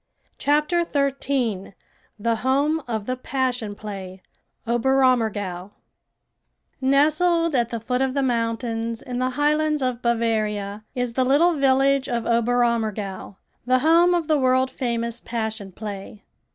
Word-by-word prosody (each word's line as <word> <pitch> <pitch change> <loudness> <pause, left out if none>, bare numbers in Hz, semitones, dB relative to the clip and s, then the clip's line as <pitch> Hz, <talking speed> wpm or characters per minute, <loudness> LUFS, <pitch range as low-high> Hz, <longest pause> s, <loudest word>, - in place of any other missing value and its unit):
CHAPTER 300 +4 +2
XIII 275 - -1 0.4
THE 230 +2 0
HOME 280 +6 +1
OF 220 -3 -3
THE 255 - -2
PASSION 250 -5 -2
PLAY 195 -3 -8 0.4
OBERAMMERGAU 230 -7 +1 1.1
Nestled 310 +5 +3
at 240 -2 +1
the 230 - -4
foot 250 +3 -2
of 265 0 0
the 275 - +1
mountains 230 -1 -2
in 250 -1 -4
the 255 0 +1
highlands 300 0 +1
of 250 -2 -2
Bavaria, 215 -3 -1
is 245 -2 -2
the 260 - +1
little 295 +7 +4
village 275 -1 +2
of 235 -2 -2
Oberammergau, 230 -5 0 0.3
the 255 0 +4
home 340 +2 +5
of 335 -3 -1
the 310 -2 +2
world 260 0 +2
famous 235 -2 -2
Passion 220 -4 -4
Play. 205 +1 -8
245 Hz, 125 wpm, -23 LUFS, 225-275 Hz, 1.1 s, home